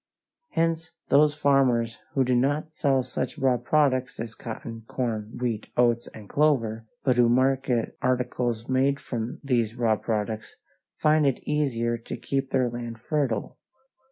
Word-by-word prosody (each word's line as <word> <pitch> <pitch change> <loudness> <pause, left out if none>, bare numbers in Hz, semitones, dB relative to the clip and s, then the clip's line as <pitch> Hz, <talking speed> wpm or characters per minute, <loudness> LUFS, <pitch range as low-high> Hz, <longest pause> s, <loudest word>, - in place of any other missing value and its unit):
Hence 165 0 -1
those 150 +1 +5
farmers 130 -6 +2 0.2
who 135 - +4
do 125 0 +2
not 145 +5 +1
sell 135 -4 +1
such 125 - -4
raw 130 -2 +3
products 130 0 +1
as 115 -1 -5
cotton, 115 0 -7
corn, 110 -4 -3
wheat, 115 -4 -2
oats, 120 -1 +3
and 105 -2 -11
clover, 115 -7 +1 0.2
but 130 -2 +2
who 120 -1 +5
market 130 -1 +1
articles 125 -2 0
made 135 +2 +2
from 120 -2 -4
these 120 -5 +1
raw 115 -3 +2
products, 110 0 -3 0.4
find 155 -1 +3
it 135 - -2
easier 120 -6 0
to 115 - -6
keep 135 -1 -2
their 130 -2 +2
land 120 -1 -5
fertile. 125 -3 -2
125 Hz, 145 wpm, -26 LUFS, 115-140 Hz, 0.4 s, those